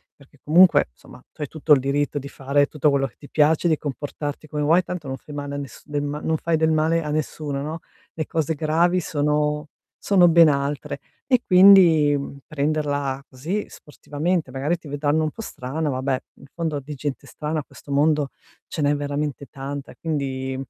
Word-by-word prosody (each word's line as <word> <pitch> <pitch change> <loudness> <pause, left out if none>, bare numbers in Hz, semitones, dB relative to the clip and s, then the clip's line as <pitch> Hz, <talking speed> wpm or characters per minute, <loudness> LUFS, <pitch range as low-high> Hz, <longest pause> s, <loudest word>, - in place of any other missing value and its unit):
perché 140 0 -22
comunque, 175 - +5
insomma, - - -16
tu - - -14
hai 150 - -2
tutto 155 -1 +3
il 140 - +5
diritto 145 +2 -1
di 140 0 -8
fare 140 +1 +1
tutto 150 0 +1
quello 140 -1 +1
che 120 - -20
ti 145 - -14
piace, 155 +2 +3
di 160 -2 +3
comportarti 145 +1 -5
come 150 -1 -3
vuoi, 165 +5 +4
tanto 180 -4 -6
non 135 0 -4
fai 150 +2 -11
male 145 0 -4
a - - -3
nes 140 -4 -8
del 145 -1 -2
ma 145 +1 -3
non 160 0 0
fai 165 +1 0
del 160 0 +2
male 160 +1 +2
a 150 - -4
nessuno, 150 -2 -3
no? 155 +3 -4 0.3
Le 155 - -3
cose 160 0 -1
gravi 165 +4 +2
sono 150 0 0 0.3
sono 180 -3 +5
ben 165 0 +7
altre, 140 0 -1 0.3
e 255 -3 +3
quindi 180 -6 +7 0.3
prenderla 145 -2 -1
così 160 +11 -3
sportivamente, 155 +2 -3
magari 140 +6 -1
ti 165 - -14
vedranno 145 +2 0
un 155 - 0
po' 225 - -9
strana, 150 - -4
vabbè, 130 0 -1
in - - -16
fondo 160 -4 -2
di 145 +2 -8
gente 140 0 -5
strana 155 +1 -3
a - - -5
questo 145 - -13
mondo 145 0 +2 0.4
ce 160 - -4
n'è 145 0 +3
veramente 145 -1 -3
tanta, 140 +1 -7
quindi 135 -4 -3
150 Hz, 190 wpm, -23 LUFS, 140-160 Hz, 0.4 s, ben